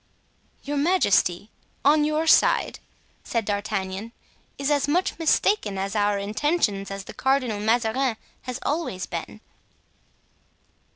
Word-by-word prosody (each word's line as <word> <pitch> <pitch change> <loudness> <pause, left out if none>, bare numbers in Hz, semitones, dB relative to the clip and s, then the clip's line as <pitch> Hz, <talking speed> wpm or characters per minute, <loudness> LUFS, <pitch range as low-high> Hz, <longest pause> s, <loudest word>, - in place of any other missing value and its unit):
"Your 290 0 -3
majesty, 225 - +2 0.3
on 300 +1 +5
your 305 +1 0
side," 320 - +4 0.4
said 230 -3 -2
D'Artagnan, 205 +1 -3 0.4
"is 280 +1 -1
as 285 -1 +2
much 345 +3 0
mistaken 320 - +2
as 195 +1 -2
to 210 - -1
our 205 0 +2
intentions 210 - 0
as 195 0 -6
the - - -10
Cardinal 255 -5 0
Mazarin 230 +3 +1 0.2
has 250 -1 -5
always 290 - -2
been." 170 +5 -6
225 Hz, 120 wpm, -24 LUFS, 200-290 Hz, 0.4 s, on